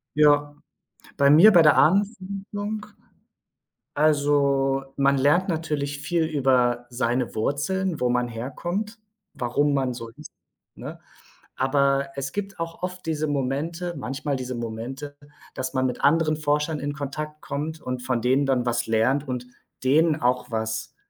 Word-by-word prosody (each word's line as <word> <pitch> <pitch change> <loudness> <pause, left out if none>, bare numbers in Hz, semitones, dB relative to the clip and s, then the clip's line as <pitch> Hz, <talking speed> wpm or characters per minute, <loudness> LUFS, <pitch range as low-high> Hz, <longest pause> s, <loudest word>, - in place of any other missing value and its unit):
Ja, 145 -1 +4 0.6
bei 140 0 +4
mir 185 +9 +8
bei 170 -3 +7
der 150 -2 +6
Ahnenforschung? 205 +2 0 1.1
Also, 140 -2 +2
man 140 0 +3
lernt 160 +8 +3
natürlich 150 -4 -2
viel 165 +2 0
über 130 -5 +1
seine 120 0 -1
Wurzeln, 165 - -1
wo 125 - +2
man 125 0 +1
herkommt, 175 - -4 0.4
warum 140 +4 0
man 130 -2 0
so 115 -1 -7
ist, - - -13 0.4
ne? - - -8 0.6
Aber 140 +1 +2
es 140 0 -4
gibt 200 -2 -5
auch 165 +1 -5
oft 180 0 -5
diese 155 -1 -1
Momente 150 +6 -2
manchmal 140 +2 -3
diese 130 0 -5
Momente, 120 +5 -6 0.4
dass 130 +1 -4
man 130 0 +1
mit 125 - -3
anderen 155 +1 +3
Forschern 150 +1 0
in 145 +1 -3
Kontakt 150 +1 -6
kommt 155 +2 -4
und 125 0 -4
von 125 -3 -1
denen 135 +3 +2
dann 130 -2 +1
was 120 -1 0
lernt 130 +6 +1
und 125 -1 -4 0.4
denen 155 +3 +4
auch 125 0 +1
was, 110 0 -3
140 Hz, 140 wpm, -24 LUFS, 130-160 Hz, 1.1 s, mir